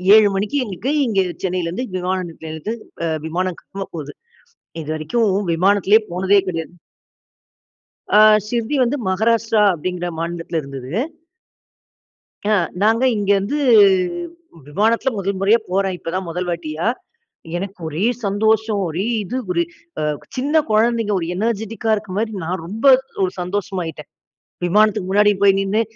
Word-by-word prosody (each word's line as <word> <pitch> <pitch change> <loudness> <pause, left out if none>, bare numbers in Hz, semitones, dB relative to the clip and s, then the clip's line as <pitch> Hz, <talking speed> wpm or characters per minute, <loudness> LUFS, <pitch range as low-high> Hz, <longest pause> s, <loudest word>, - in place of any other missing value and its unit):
7:00 215 -2 +6
மணிக்கு 205 +8 -1
எங்களுக்கு 210 +7 -3 0.2
இங்க 205 -4 +1 0.2
சென்னையிலிருந்து 180 +5 -2
விமான 185 +1 -1
நிலையத்திலிருந்து 160 +5 -6 0.3
அ 165 - 0 0.2
விமானம் 180 +2 -2
கிளம்ப 195 0 -7
போகுது. 150 -3 -6 0.7
இதுவரைக்கும் 155 +9 0 0.2
விமானத்திலேயே 200 +4 +4
போனதே 190 +3 +3
கிடையாது. 165 -1 -4 1.4
அ - - +8 0.3
ஷிர்டி 235 +5 -2
வந்து 250 +4 +1
மகாராஷ்டிரா 220 +2 +2
அப்படிங்கிற 175 +2 -3
மாநிலத்தில 170 -1 -3
இருந்தது. 135 0 -8 1.6
அ. - - +3 0.3
நாங்க 225 +4 +3
இங்கே 205 -1 +2
இருந்து 200 +10 -1 1.1
விமானத்தில 220 - +1
முதல் 195 0 -2
முறையா 205 +4 +4
போறேன். 190 0 +1
இப்போதான் 185 +2 -4
முதல் 180 +2 -3
வாட்டியா. 160 0 -3 0.7
எனக்கு 195 +2 -5
ஒரே 160 +7 -2 0.2
சந்தோஷம். 215 +1 +1
ஒரே 180 +6 -2 0.2
இது 235 +6 -5
ஒரு 345 - +2 0.7
சின்ன 275 +3 -1
அ - - -20
குழந்தைங்க 225 0 +2
ஒரு 165 - -3
எனர்ஜிடிக்கா 220 +1 -2
இருக்கிற 205 -3 -5
மாரி 220 0 -1
நான் 175 +1 -3
ரொம்ப, 215 +7 -7 0.4
ஒரு 185 - -1
சந்தோஷமாயிட்டேன். 180 -4 -4 0.6
விமானத்துக்கு 210 0 +2
முன்னாடி 205 +1 +5
போய் 195 -1 +6
நின்னு 205 +3 +1
195 Hz, 125 wpm, -20 LUFS, 175-220 Hz, 1.6 s, அ